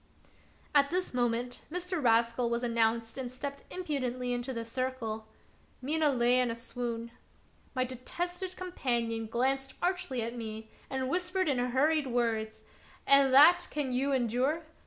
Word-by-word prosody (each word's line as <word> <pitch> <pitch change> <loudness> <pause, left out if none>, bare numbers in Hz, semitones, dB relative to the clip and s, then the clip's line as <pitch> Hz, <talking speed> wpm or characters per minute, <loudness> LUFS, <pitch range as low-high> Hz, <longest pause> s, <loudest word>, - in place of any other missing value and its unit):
At 280 -1 +5
this 365 -1 -1
moment 245 0 -1
Mr. 360 -2 -2
Rascal 235 +1 +3
was 235 +1 -1
announced 230 0 0
and 250 -2 -4
stepped 280 +2 -6
impudently 255 -8 -2
into 245 +2 -3
the 230 -2 -4
circle. 230 -3 -3 0.5
Mina 300 +3 +1
lay 250 -1 +3
in 250 -1 +2
a 230 - -2
swoon. 235 -1 -4 0.6
My 255 - +2
detested 350 +9 -4
companion 235 -10 -2
glanced 265 +4 -1
archly 355 -9 -1
at 235 +2 -4
me 220 -1 -7 0.2
and 265 -1 -2
whispered 360 +4 0
in 270 -4 +1
hurried 275 +5 +2
words: 220 -3 -1 0.2
" - - -26
And 275 -1 +6
that 345 +6 +8
can 290 -3 -2
you 265 +3 +1
endure 260 +5 +1
255 Hz, 145 wpm, -31 LUFS, 235-285 Hz, 0.6 s, that